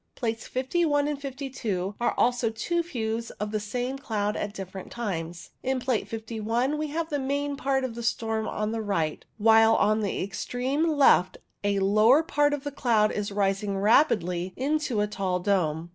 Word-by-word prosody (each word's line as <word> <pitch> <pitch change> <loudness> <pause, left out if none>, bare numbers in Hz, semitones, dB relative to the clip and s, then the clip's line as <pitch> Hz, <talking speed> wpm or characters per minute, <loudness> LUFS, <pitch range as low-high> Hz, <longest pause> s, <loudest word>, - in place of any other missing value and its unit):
Plates 225 -2 -3
51 290 +2 +1
and 295 -1 -3
52 255 -9 -3
are 240 - +1
also 245 -1 +2
two 340 +10 -1
views 230 -7 -3
of 210 0 -3
the 215 - 0
same 245 +5 -3
cloud 210 -6 -1
at 205 - -3
different 190 -2 -8
times. 175 -7 -5
In 260 0 0
Plate 250 -3 -1
51 225 +5 -2
we 305 - -1
have 320 +2 -3
the 290 - 0
main 285 +1 -1
part 270 -1 0
of 255 -3 -3
the 235 - -6
storm 225 -1 -1
on 215 0 -2
the 225 0 -2
right, 165 -8 -1
while 225 +1 +6
on 215 +1 +3
the 200 - -1
extreme 250 - -1
left 275 - +4 0.3
a 200 0 +1
lower 215 +9 +5
part 295 -3 +2
of 280 - -9
the 290 - -4
cloud 225 -6 +2
is 205 -1 -3
rising 195 0 0
rapidly 190 - +2
into 280 -4 0
a - - +2
tall 190 -3 -1
dome. 170 -4 0
225 Hz, 175 wpm, -27 LUFS, 205-270 Hz, 0.3 s, while